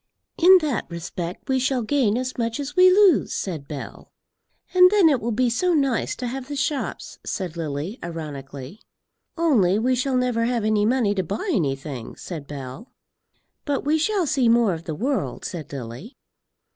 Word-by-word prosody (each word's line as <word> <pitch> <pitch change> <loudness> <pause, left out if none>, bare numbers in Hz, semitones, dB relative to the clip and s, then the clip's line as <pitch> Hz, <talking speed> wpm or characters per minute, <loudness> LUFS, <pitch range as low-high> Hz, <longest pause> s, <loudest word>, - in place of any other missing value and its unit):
"In 370 +3 +8
that 285 -8 -2
respect 170 +1 -6
we 265 -1 +1
shall 260 -1 0
gain 235 -3 +1
as 255 0 -3
much 230 +1 -2
as 285 +1 -5
we 370 0 +7
lose," 375 -4 +4
said 160 -8 -4
Bell. 145 -3 -8 0.6
"And 365 0 +8
then 400 -4 +5
it 275 -5 +1
will 235 +2 -2
be 250 +3 +1
so 340 +10 +1
nice 275 -5 0
to 250 - -5
have 255 +1 -5
the 290 - -5
shops," 280 0 -3
said 180 -4 -4
Lily, 160 - -4
ironically. 145 -1 -7 0.6
"Only 230 - +3
we 250 +4 +1
shall 255 +1 0
never 245 -2 +1
have 235 -2 0
any 215 -1 +2
money 235 -4 +2
to 195 - 0
buy 210 - -3
anything," 135 - -3
said 155 -6 -8
Bell. 140 - -8 0.7
"But 285 -2 -2
we 310 +2 +2
shall 395 +2 +1
see 270 -5 +2
more 230 -4 +4
of 165 0 -7
the 160 - -4
world," 265 - -2
said 170 -5 -6
Lily. 135 - -8
230 Hz, 175 wpm, -23 LUFS, 170-275 Hz, 0.7 s, In